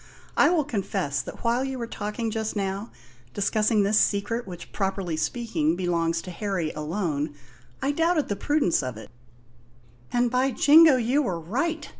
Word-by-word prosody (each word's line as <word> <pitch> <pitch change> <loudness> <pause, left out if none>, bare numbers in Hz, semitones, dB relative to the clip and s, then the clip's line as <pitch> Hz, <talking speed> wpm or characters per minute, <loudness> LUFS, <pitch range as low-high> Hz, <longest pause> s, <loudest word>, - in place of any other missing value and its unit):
I - - +5
will 340 -3 +2
confess 195 - -2
that - - -10
while 240 +2 +1
you 265 -1 -3
were 235 - -3
talking 220 +1 -4
just 220 0 -3
now, 200 +2 -3 0.5
discussing 210 +1 +2
this 210 +2 +3
secret 205 +3 0
which 175 -2 -9
properly 190 -4 -2
speaking 165 -4 -1
belongs 170 -2 0
to 185 - -7
Harry 180 -4 -2
alone, 150 -2 -3 0.5
I 275 - +2
doubted 325 0 +1
the 205 - -1
prudence 290 - +1
of 125 -4 -5
it 110 - -11 0.5
" 120 0 -30
"And, 245 -1 +1
by 255 +2 +2
Jingo, 300 +4 +7
you 250 +5 +2
were 185 - -2
right!" 285 - -2
205 Hz, 165 wpm, -25 LUFS, 170-245 Hz, 0.5 s, Jingo